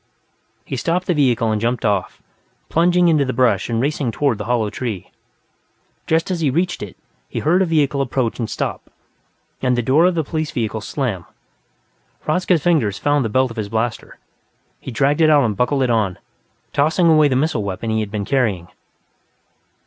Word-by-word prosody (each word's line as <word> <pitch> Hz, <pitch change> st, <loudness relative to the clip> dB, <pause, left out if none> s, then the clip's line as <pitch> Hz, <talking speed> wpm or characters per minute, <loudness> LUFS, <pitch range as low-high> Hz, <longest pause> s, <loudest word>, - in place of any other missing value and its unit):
He -, -, -4 dB
stopped 180 Hz, +1 st, -1 dB
the 180 Hz, -, +1 dB
vehicle 125 Hz, -7 st, +2 dB
and 105 Hz, -1 st, -1 dB
jumped 120 Hz, +1 st, -1 dB
off, 100 Hz, -3 st, -1 dB, 0.5 s
plunging 175 Hz, +1 st, +3 dB
into 155 Hz, -4 st, +3 dB
the 130 Hz, -1 st, -2 dB
brush 115 Hz, -7 st, +2 dB
and 115 Hz, -1 st, 0 dB
racing 140 Hz, 0 st, -1 dB
toward 135 Hz, -4 st, 0 dB
the 105 Hz, -, -4 dB
hollow 115 Hz, -3 st, 0 dB
tree. 110 Hz, -6 st, -5 dB, 1.0 s
Just 165 Hz, +3 st, +1 dB
as 180 Hz, -, -1 dB
he 155 Hz, -4 st, +1 dB
reached 175 Hz, +6 st, -1 dB
it, 100 Hz, -3 st, -8 dB, 0.3 s
he -, -, -7 dB
heard 175 Hz, +5 st, +2 dB
a 190 Hz, -, +2 dB
vehicle 145 Hz, -4 st, +1 dB
approach 130 Hz, -3 st, -1 dB
and 115 Hz, -, -2 dB
stop, -, -, -4 dB, 0.7 s
and 125 Hz, -1 st, +1 dB
the 120 Hz, -, 0 dB
door 145 Hz, +8 st, +4 dB
of 180 Hz, -, 0 dB
the 160 Hz, -, 0 dB
police 155 Hz, +1 st, -3 dB
vehicle 110 Hz, -3 st, -3 dB
slam. 105 Hz, -, -3 dB, 0.9 s
Hradzka's 170 Hz, 0 st, +1 dB
fingers 140 Hz, -, +2 dB
found 145 Hz, +4 st, +1 dB
the 115 Hz, -, -2 dB
belt 130 Hz, +2 st, +1 dB
of 115 Hz, -, -10 dB
his 105 Hz, -2 st, -3 dB
blaster; 115 Hz, +1 st, -3 dB, 0.6 s
he -, -, -8 dB
dragged 140 Hz, +6 st, +1 dB
it 155 Hz, -, +5 dB
out 145 Hz, -2 st, +5 dB
and 110 Hz, -3 st, 0 dB
buckled 130 Hz, +5 st, +1 dB
it 125 Hz, -, +1 dB
on, 105 Hz, -6 st, 0 dB, 0.6 s
tossing 160 Hz, +5 st, +2 dB
away 155 Hz, -2 st, +5 dB
the 130 Hz, -, 0 dB
missile 130 Hz, -5 st, 0 dB
weapon 100 Hz, +3 st, -4 dB
he 110 Hz, -, +1 dB
had 105 Hz, -2 st, -3 dB
been 105 Hz, -1 st, -3 dB
carrying. 105 Hz, -9 st, 0 dB
130 Hz, 185 wpm, -19 LUFS, 110-155 Hz, 1.0 s, it